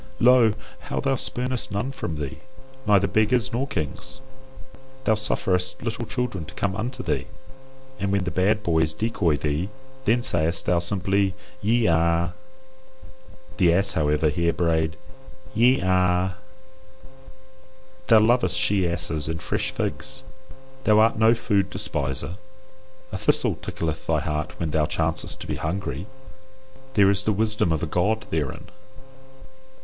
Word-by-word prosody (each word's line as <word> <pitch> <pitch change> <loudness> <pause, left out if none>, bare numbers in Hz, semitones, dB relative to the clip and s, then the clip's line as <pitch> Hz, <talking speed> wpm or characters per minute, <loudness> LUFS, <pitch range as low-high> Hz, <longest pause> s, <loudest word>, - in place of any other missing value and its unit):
Lo! 120 -3 +5 0.3
how - - -1
thou 135 -1 +1
spurnest 125 -1 -2
none 105 +7 -2
from 110 -11 -5
thee, 70 -3 -5 0.5
neither 100 -2 +5
beggars 110 +5 +1
nor 130 +4 -1
kings. 80 - -5 0.8
Thou 110 - +3
sufferest 95 -4 -1
little 115 0 -3
children 125 -9 -2
to 75 - -12
come 100 -1 -1
unto 120 +5 -4
thee, - - -2 0.7
and 100 0 -1
when 100 -1 +1
the 90 - -3
bad 100 +5 +1
boys 80 -3 +1
decoy 100 -8 0
thee, 75 +6 -2 0.4
then 120 +3 +2
sayest 85 -7 +4
thou 85 -1 +2
simply, 95 +2 0 0.3
YE 115 +3 +2
A. 85 +1 +2 1.2
The 90 -4 +4
ass, 95 +1 +3
however, 75 0 +1
here 85 +2 0
brayed 80 -2 0 0.6
YE 125 +4 +4
A. 90 0 +1 1.7
Thou 115 -3 +7
lovest 120 +4 +3
she 100 -9 +2
asses 80 -3 +2
and 80 +1 -3
fresh 105 +7 -1
figs, 130 +2 -3 0.6
thou 105 -3 +4
art 110 0 +4
no 110 +1 +5
food 100 -4 0
despiser. 70 +5 -3 0.7
A 95 - -4
thistle - - +2
tickleth 80 -2 -4
thy - - +1
heart 75 -1 -4
when 80 -2 -2
thou 75 -1 +1
chancest 80 0 -1
to - - -6
be - - -3
hungry. 85 0 -4 0.9
There 100 -2 +6
is 100 0 +2
the 110 - 0
wisdom 105 -4 +1
of 80 +1 -1
a - - +2
God 105 +7 0
therein. 75 -4 -2
95 Hz, 140 wpm, -24 LUFS, 80-110 Hz, 1.7 s, Thou